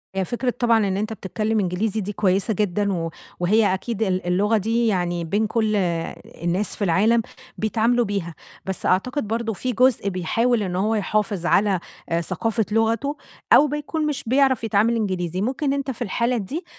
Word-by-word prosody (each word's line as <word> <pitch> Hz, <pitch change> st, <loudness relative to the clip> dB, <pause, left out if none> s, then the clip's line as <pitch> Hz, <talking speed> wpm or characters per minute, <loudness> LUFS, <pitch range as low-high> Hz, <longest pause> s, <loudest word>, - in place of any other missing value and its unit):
هي 190 Hz, -1 st, 0 dB
فكرة 245 Hz, +4 st, -2 dB
طبعًا 230 Hz, -4 st, +3 dB
إن 190 Hz, 0 st, -1 dB
أنتَ 215 Hz, +2 st, -2 dB
بتتكلّم 215 Hz, +2 st, -2 dB
إنجليزي 200 Hz, +3 st, -1 dB
دي 205 Hz, +2 st, -4 dB
كويّسة 195 Hz, +2 st, +1 dB
جدًا، 200 Hz, 0 st, 0 dB
و 165 Hz, -2 st, -3 dB, 0.3 s
وهي 200 Hz, +2 st, +3 dB
أكيد 220 Hz, +3 st, -2 dB
ال 185 Hz, -3 st, -1 dB
اللغة 205 Hz, +5 st, +2 dB
دي 230 Hz, +3 st, +1 dB
يعني 175 Hz, -4 st, 0 dB
بين 205 Hz, +6 st, 0 dB
كلّ 220 Hz, -1 st, 0 dB, 0.7 s
الناس 180 Hz, +5 st, 0 dB
في -, -, -3 dB
العالم 210 Hz, +6 st, +3 dB, 0.4 s
بيتعاملوا 230 Hz, +2 st, +1 dB
بيها، 195 Hz, -5 st, -3 dB, 0.3 s
بس 190 Hz, -1 st, -4 dB
أعتقد 235 Hz, +7 st, +1 dB
برضو 225 Hz, +1 st, -1 dB
في 250 Hz, +6 st, -3 dB
جزء 250 Hz, -4 st, +3 dB
بيحاول 215 Hz, +6 st, +1 dB
إن 180 Hz, -2 st, -3 dB
هو 210 Hz, +4 st, +1 dB
يحافظ 210 Hz, -3 st, -1 dB
على 195 Hz, +1 st, +3 dB, 0.4 s
ثقافة 225 Hz, +6 st, -1 dB
لغته، 225 Hz, +6 st, +1 dB, 0.4 s
أو 300 Hz, -, +7 dB
بيكون 295 Hz, +2 st, -2 dB
مش 295 Hz, -2 st, -2 dB
بيعرف 260 Hz, -1 st, +3 dB
يتعامل 225 Hz, +2 st, +2 dB
إنجليزي، 185 Hz, -5 st, -2 dB
ممكن 270 Hz, +5 st, 0 dB
أنتَ 275 Hz, -1 st, -2 dB
في 245 Hz, -, -11 dB
الحالة 235 Hz, +3 st, 0 dB
دي 285 Hz, -, -4 dB
215 Hz, 170 wpm, -23 LUFS, 190-235 Hz, 0.7 s, أو